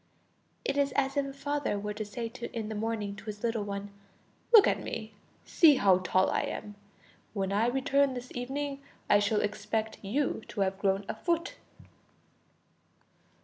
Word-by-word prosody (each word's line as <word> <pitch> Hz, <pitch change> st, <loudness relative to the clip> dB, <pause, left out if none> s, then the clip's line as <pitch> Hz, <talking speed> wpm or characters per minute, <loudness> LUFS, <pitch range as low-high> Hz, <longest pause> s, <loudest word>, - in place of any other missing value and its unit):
It 285 Hz, -, 0 dB
is 280 Hz, -1 st, +2 dB
as 270 Hz, 0 st, +1 dB
if 280 Hz, -1 st, +1 dB
a -, -, -5 dB
father 285 Hz, -4 st, -2 dB
were 210 Hz, +1 st, -3 dB
to 215 Hz, +1 st, -4 dB
say 230 Hz, +3 st, -5 dB, 0.3 s
in 220 Hz, -2 st, -3 dB
the -, -, -3 dB
morning 215 Hz, -2 st, -2 dB
to 215 Hz, -, -11 dB
his 210 Hz, 0 st, -7 dB
little 230 Hz, -2 st, 0 dB
one: 200 Hz, 0 st, -5 dB, 0.6 s
"Look 445 Hz, -4 st, +9 dB
at -, -, +1 dB
me, 220 Hz, -1 st, -5 dB, 0.3 s
see 310 Hz, -4 st, +6 dB
how 190 Hz, -6 st, +4 dB
tall 185 Hz, 0 st, +2 dB
I -, -, +1 dB
am; 205 Hz, -, -5 dB, 0.6 s
when 195 Hz, -1 st, -1 dB
I 215 Hz, +3 st, +3 dB
return 270 Hz, +1 st, +2 dB
this 250 Hz, 0 st, -7 dB
evening, 275 Hz, +3 st, -3 dB, 0.3 s
I 205 Hz, -, +7 dB
shall 210 Hz, +1 st, +2 dB
expect 215 Hz, +2 st, -2 dB
you 255 Hz, +6 st, 0 dB
to 205 Hz, -, -4 dB
have 190 Hz, 0 st, 0 dB
grown 195 Hz, 0 st, +1 dB
a -, -, -2 dB
foot." 340 Hz, -1 st, -1 dB
220 Hz, 170 wpm, -30 LUFS, 205-275 Hz, 0.6 s, Look